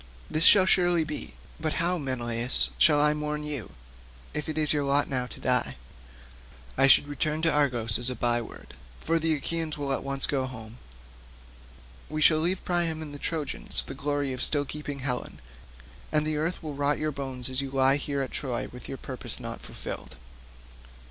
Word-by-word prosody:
This 155 +2 +5
shall 195 -3 +8
surely 175 -3 +3
be; 150 -1 -5 0.2
but 155 -1 -1
how, 175 +1 0
Menelaus, 120 - +1
shall 145 - +6
I 150 0 +4
mourn 150 0 -3
you, 145 -8 -4 0.6
if 150 +1 -3
it 155 - -3
be 155 - +1
your 145 -1 +1
lot 140 +1 +3
now 125 -2 -2
to - - -11
die? - - +1 1.0
I 135 +1 +4
should 140 - +6
return 150 +2 -2
to 165 - +4
Argos 120 -8 +2
as 120 +1 +2
a 125 - -4
by 120 -1 +1
word, 115 - -11 0.3
for 165 +1 0
the 160 0 +2
Achaeans 160 +1 -2
will 140 -2 -1
at - - -2
once 140 0 +2
go 135 -2 -1
home. 115 -2 -10 1.3
We 155 - -3
shall 155 0 +6
leave 180 +4 -1
Priam 170 -3 0
and 150 -2 -9
the 145 - -8
Trojans 150 -3 0
the - - -8
glory 140 0 -2
of 130 - -4
still 145 0 0
keeping 145 -1 -6
Helen, 125 -2 -3 0.7
and 150 0 +2
the 155 0 -1
earth 165 +3 -2
will 155 -2 -5
rot 145 +1 0
your 155 0 -1
bones 135 -3 -3
as 130 +1 +1
you 135 - -5
lie 135 +1 +3
here 140 -1 -3
at 130 - -6
Troy 125 -4 -2
with 125 - -10
your 135 - -5
purpose 130 -2 -2
not - - -6
fulfilled. - - -8
145 Hz, 190 wpm, -27 LUFS, 130-155 Hz, 1.3 s, shall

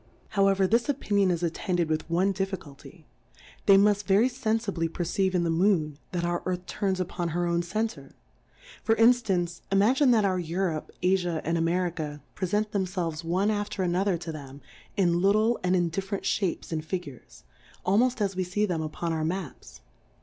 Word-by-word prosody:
How 195 -2 +3
ever, 195 -1 +3
this 230 +6 +1
Opinion 205 -8 +1
is 175 -1 -1
attended 175 0 -1
with 155 +1 -2
one 180 +4 +2
Difficulty; 190 -7 -6 0.6
they 195 - +8
muft 205 0 +3
very 205 +6 +4
fenfibly 220 -9 -1
per 175 - -3
ceive 190 +2 0
in 175 - +2
the 165 - 0
Moon, 165 -4 +1
that 175 -1 -2
our 175 0 -1
Earth 180 0 -2
turns 190 -2 -1
upon 175 -1 -2
her 175 - +1
own 170 0 +1
Center. 220 +6 -4 0.7
For 225 - +3
In 225 +2 +7
ftance, 185 -8 -1
imagine 245 +8 +4
that 225 -4 +4
our 185 -2 +1
Europe^ 170 -1 -2
AJia^ 180 -3 +1
and 165 - 0
America 165 -4 -1
prefent 205 +3 -1
themfelves 180 -5 -2
one 185 +5 +1
af 205 -1 -2
ter 190 - -2
another 180 +1 +1
to 165 0 -6
them 140 -3 -9 0.4
in 175 -3 +2
little, 215 +4 +3
and 180 0 +2
in 175 -2 +2
dif 195 +4 -4
ferent 200 -2 -3
Shapes 190 -5 -1
and 155 -1 -2
Figures, 155 -7 -7 0.4
almoft 235 +5 +2
as 195 -2 0
we 185 - 0
fee 190 +4 0
them 175 -5 -2
upon 160 +2 -3
our 160 -1 -1
Ma 170 -2 -2
ps. - - -16
185 Hz, 185 wpm, -27 LUFS, 170-200 Hz, 0.7 s, they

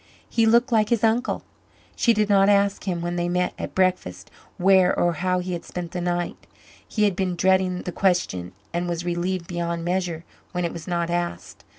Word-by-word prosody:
He 225 -1 +2
looked 235 +3 +4
like 215 -2 +3
his 235 -3 +1
uncle. 230 +2 +1 0.5
She 235 - +3
did 210 -2 +2
not 200 -1 +4
ask 200 0 +2
him, 175 -3 -2
when 175 +1 -3
they 175 0 0
met 180 0 0
at - - -6
breakfast, 180 - 0 0.3
where 185 0 +4
or 175 0 +2
how 180 +3 0
he 180 0 -3
had 170 - -4
spent 175 -1 -6
the 180 - -3
night. 175 0 -3 0.4
He 215 - 0
had 200 -3 +2
been 185 -1 -1
dreading 185 0 +2
the 180 - -4
question 170 - 0 0.2
and 175 +1 -1
was 170 0 -3
relieved 175 +1 -2
beyond 170 -1 -3
measure 175 -2 -2 0.3
when 180 -1 -1
it 170 - -3
was 165 -1 -8
not 170 -1 -1
asked. 175 0 -4
180 Hz, 200 wpm, -24 LUFS, 175-195 Hz, 0.5 s, looked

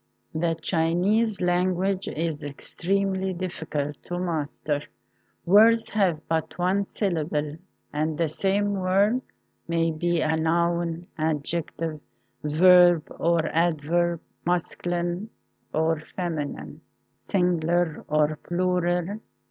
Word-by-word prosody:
The 165 +1 0
Chinese 185 +7 +1
language 185 +2 +1
is 160 -1 -2
extremely 190 +6 -1
difficult 160 -5 -4
to 175 - -4
master. 155 -4 -2 0.6
Words 220 +5 +5
have 180 -7 +1
but 160 -1 -2
one 185 +3 +1
syllable, 155 -7 -2 0.4
and 155 +1 -1
the 165 - +1
same 200 +6 0
word 200 +6 +2 0.5
may 165 0 +1
be 170 +2 0
a 155 +1 +2
noun, 170 +1 0
adjective, 160 +1 -2 0.4
verb 175 +1 +5
or 170 -1 +2
adverb, 170 +1 +1 0.2
masculine 175 +2 -1 0.4
or 160 0 +1
feminine, 155 -3 -5 0.5
sing 180 -3 +2
ular 170 0 0
or 150 0 +2
plural. 180 +2 0
170 Hz, 100 wpm, -25 LUFS, 160-185 Hz, 0.6 s, Words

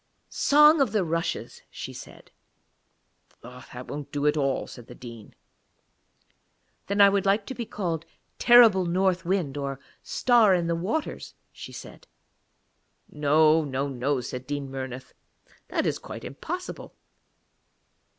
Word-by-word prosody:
'Song 300 +1 +5
of 240 -6 +1
the 210 -3 +2
Rushes,' 165 +1 -3
she - - -8
said. - - -12 1.1
'That 125 0 -11
won't 145 0 -7
do 145 0 -2
at 150 - +3
all,' 135 -3 0
said 120 -2 -12
the - - -11
Dean. 115 -3 -12 1.5
'Then 200 +1 -1
I 200 - +9
would 200 0 +1
like 200 +1 +2
to - - -6
be 235 -3 -6
called 170 -5 -4 0.3
Terrible 225 -7 +6
North 185 0 +1
Wind, 170 -7 -1
or 140 -1 -4 0.2
Star 230 -6 +3
in 175 -1 0
the 170 - 0
Waters,' 200 - -4 0.2
she - - -10
said. - - -11 1.0
'No, 155 +2 +3
no, 140 -1 -2
no,' 135 0 -1
said 125 +1 -7
Dean 145 -2 -4
Murnith; 130 -1 -7 0.5
'that - - -1
is - - -1
quite - - -9
impossible. 350 - -7
160 Hz, 135 wpm, -26 LUFS, 135-200 Hz, 1.5 s, I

